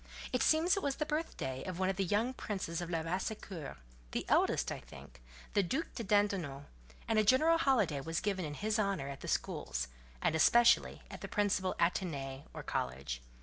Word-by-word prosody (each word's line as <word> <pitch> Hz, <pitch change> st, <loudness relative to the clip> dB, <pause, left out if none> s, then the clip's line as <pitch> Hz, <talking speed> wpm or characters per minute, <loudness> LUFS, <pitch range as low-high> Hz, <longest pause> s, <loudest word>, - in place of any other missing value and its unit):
It 250 Hz, -, +2 dB
seems 330 Hz, +5 st, +4 dB
it 395 Hz, -, -1 dB
was 280 Hz, -4 st, 0 dB
the 305 Hz, -, -1 dB
birthday 300 Hz, -, -3 dB
of 185 Hz, -2 st, -4 dB
one 190 Hz, 0 st, +1 dB
of 190 Hz, -, 0 dB
the 195 Hz, -, 0 dB
young 210 Hz, +7 st, +1 dB
princes 185 Hz, -8 st, -3 dB
of 175 Hz, -, -4 dB
Labassecour—the 160 Hz, -, -4 dB
eldest, -, -, +3 dB
I -, -, -4 dB
think, -, -, -13 dB, 0.3 s
the 205 Hz, -, +4 dB
Duc 260 Hz, -, -2 dB
de 230 Hz, -, -4 dB
Dindonneau, 195 Hz, -9 st, +1 dB, 0.4 s
and 220 Hz, -1 st, +3 dB
a -, -, +4 dB
general 310 Hz, +9 st, +5 dB
holiday 210 Hz, -, +2 dB
was 165 Hz, +3 st, -2 dB
given 195 Hz, -3 st, -1 dB
in 150 Hz, -2 st, -4 dB
his 215 Hz, +4 st, 0 dB
honour 195 Hz, -9 st, 0 dB
at 140 Hz, -, -7 dB
the -, -, -6 dB
schools, -, -, -2 dB, 0.3 s
and -, -, +1 dB
especially 235 Hz, +9 st, +5 dB
at -, -, -8 dB
the -, -, -5 dB
principal 195 Hz, -3 st, +1 dB
"Athénée," 145 Hz, -6 st, -1 dB
or -, -, -7 dB
college. 65 Hz, -1 st, -3 dB
190 Hz, 185 wpm, -34 LUFS, 140-220 Hz, 0.4 s, general